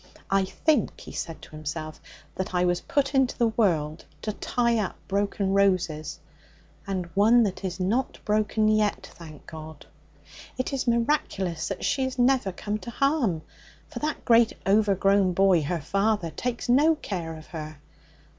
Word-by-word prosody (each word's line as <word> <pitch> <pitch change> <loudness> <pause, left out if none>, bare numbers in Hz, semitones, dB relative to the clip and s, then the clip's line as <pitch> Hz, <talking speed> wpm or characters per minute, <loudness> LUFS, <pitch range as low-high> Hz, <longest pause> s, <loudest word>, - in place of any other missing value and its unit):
I 195 0 +3
think,' 285 +4 0
he - - -10
said 165 -1 -6
to - - -13
himself, 155 +1 -6 0.3
'that 185 -1 -4
I 180 0 +3
was 175 0 +1
put 280 0 0
into 265 -2 +2
the 235 -2 +3
world 165 -9 0 0.2
to 215 - -2
tie 235 +1 0
up 205 - -2
broken 200 0 0
roses, 180 -6 +1 0.7
and 190 -2 -2
one 225 +5 +5
that 200 -2 -3
is 185 -1 -4
not 220 +8 0
broken 215 0 +1
yet, 215 -1 +1
thank 155 -4 -12
God! 155 -2 -10 0.7
It 255 +2 -2
is 270 -2 -2
miraculous 230 - 0
that 195 - -4
she 270 - +1
has 260 0 -4
never 250 -5 +3
come 205 +3 -4
to 235 - -8
harm, 240 - +1 0.5
for - - -6
that 305 0 -3
great 230 -1 +5
overgrown 195 -2 +3
boy, 190 -2 +4
her 160 +3 -2
father, 195 +1 0
takes 245 +5 -3
no 295 +6 +5
care 170 - -5
of 155 - -12
her. 155 -2 -6
200 Hz, 160 wpm, -26 LUFS, 175-235 Hz, 0.7 s, one